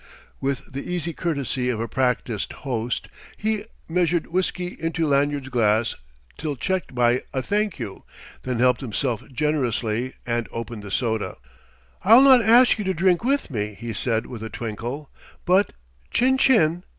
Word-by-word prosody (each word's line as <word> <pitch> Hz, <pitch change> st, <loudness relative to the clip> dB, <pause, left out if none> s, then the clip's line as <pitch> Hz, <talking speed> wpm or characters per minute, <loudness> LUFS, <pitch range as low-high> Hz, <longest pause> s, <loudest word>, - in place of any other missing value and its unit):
With 135 Hz, -1 st, -3 dB
the 140 Hz, +5 st, -5 dB
easy 170 Hz, -2 st, -2 dB
courtesy 140 Hz, -6 st, -1 dB
of 115 Hz, -3 st, -1 dB
a 115 Hz, -, -2 dB
practised 125 Hz, -4 st, -1 dB
host, 120 Hz, -2 st, -2 dB, 0.3 s
he 215 Hz, 0 st, -1 dB, 0.2 s
measured 170 Hz, -1 st, +1 dB
whiskey 180 Hz, 0 st, -2 dB
into 165 Hz, 0 st, -1 dB
Lanyard's 140 Hz, -1 st, +1 dB
glass 110 Hz, -2 st, +2 dB, 0.5 s
till 150 Hz, -2 st, -2 dB
checked 185 Hz, 0 st, -2 dB
by 120 Hz, +1 st, +3 dB
a 130 Hz, -, 0 dB
"Thank 210 Hz, +6 st, 0 dB
you," 110 Hz, -6 st, -6 dB, 0.4 s
then 125 Hz, -2 st, -2 dB
helped 125 Hz, 0 st, +3 dB
himself 125 Hz, -1 st, -2 dB
generously, 125 Hz, -4 st, -1 dB
and 120 Hz, -1 st, -1 dB
opened 115 Hz, -1 st, -5 dB
the 100 Hz, -, -8 dB
soda. 110 Hz, +1 st, -1 dB, 0.7 s
"I'll 225 Hz, +6 st, +8 dB
not 260 Hz, -3 st, +8 dB
ask 235 Hz, +1 st, +6 dB
you -, -, -1 dB
to 190 Hz, 0 st, 0 dB
drink 180 Hz, +2 st, +3 dB
with 275 Hz, -, 0 dB
me," 105 Hz, -3 st, -3 dB
he 115 Hz, 0 st, -5 dB
said 115 Hz, +1 st, 0 dB
with 120 Hz, -4 st, -8 dB
a 110 Hz, -, -5 dB
twinkle, 120 Hz, +7 st, -5 dB, 0.3 s
"but 185 Hz, +3 st, +3 dB, 0.4 s
chin 260 Hz, +2 st, +2 dB
chin!" 175 Hz, -11 st, +4 dB
135 Hz, 155 wpm, -24 LUFS, 120-180 Hz, 0.7 s, I'll